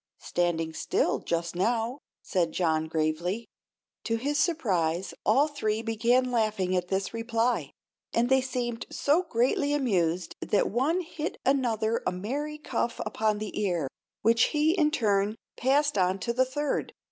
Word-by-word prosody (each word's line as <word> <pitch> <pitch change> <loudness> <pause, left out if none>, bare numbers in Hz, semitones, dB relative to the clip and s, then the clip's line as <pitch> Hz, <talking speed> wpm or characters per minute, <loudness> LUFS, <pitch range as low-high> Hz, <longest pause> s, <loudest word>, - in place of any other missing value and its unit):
"Standing 165 -2 -1
still, - - 0
just 170 0 -2
now," 230 +7 0 0.2
said 170 -3 0
John, 160 -3 +1
gravely. 160 +7 -1 0.6
To 230 - +1
his 285 +6 -1
surprise 185 - 0
all 285 +3 +5
three 225 -7 -2
began 240 +3 +2
laughing 215 -6 +1
at 180 -1 0
this 190 +2 -1
reply, 230 +1 0 0.4
and 235 +1 +2
they 265 +1 +4
seemed 245 -2 -3
so 300 +5 +2
greatly 285 -1 +1
amused 180 - 0
that 205 - +1
one 285 - +1
hit 325 -2 -5
another 230 -4 +1
a - - +2
merry 275 +12 -3
cuff 240 -5 -2
upon 215 0 0
the 210 0 -4
ear, 175 -8 0 0.4
which 230 +2 +5
he 305 +1 +2
in 325 -4 +3
turn 210 -6 +1 0.2
passed 280 -2 +2
on 185 +1 +2
to 235 - -1
the 260 +2 +3
third. 290 +3 -2
230 Hz, 145 wpm, -28 LUFS, 185-265 Hz, 0.6 s, all